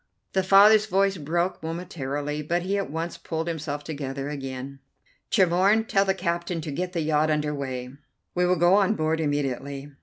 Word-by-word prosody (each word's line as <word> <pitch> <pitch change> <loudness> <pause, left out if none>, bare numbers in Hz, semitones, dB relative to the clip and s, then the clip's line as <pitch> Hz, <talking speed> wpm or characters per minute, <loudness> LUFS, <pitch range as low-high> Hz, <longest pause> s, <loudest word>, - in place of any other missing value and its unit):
The 190 - +3
father's 205 +3 +6
voice 195 -1 +2
broke 170 +4 -1
momentarily, 150 -3 -4
but 170 +4 -1
he 195 +2 -1
at 200 -1 -2
once 165 +3 -4
pulled 160 0 -4
himself 150 -3 -4
together 140 -2 -5
again. 135 -1 -6 0.5
"Tremorne, 195 +3 +3
tell 195 0 +3
the 190 -1 +1
captain 170 -1 -2
to 150 - -5
get 180 +5 -3
the 170 - -1
yacht 155 0 +2
under 150 -1 0
way. 130 -3 -5 0.4
We 180 0 +2
will 180 - +3
go 175 +2 +4
on 205 +1 +4
board 160 -2 0
immediately. 140 -1 -2
160 Hz, 175 wpm, -25 LUFS, 145-185 Hz, 0.5 s, father's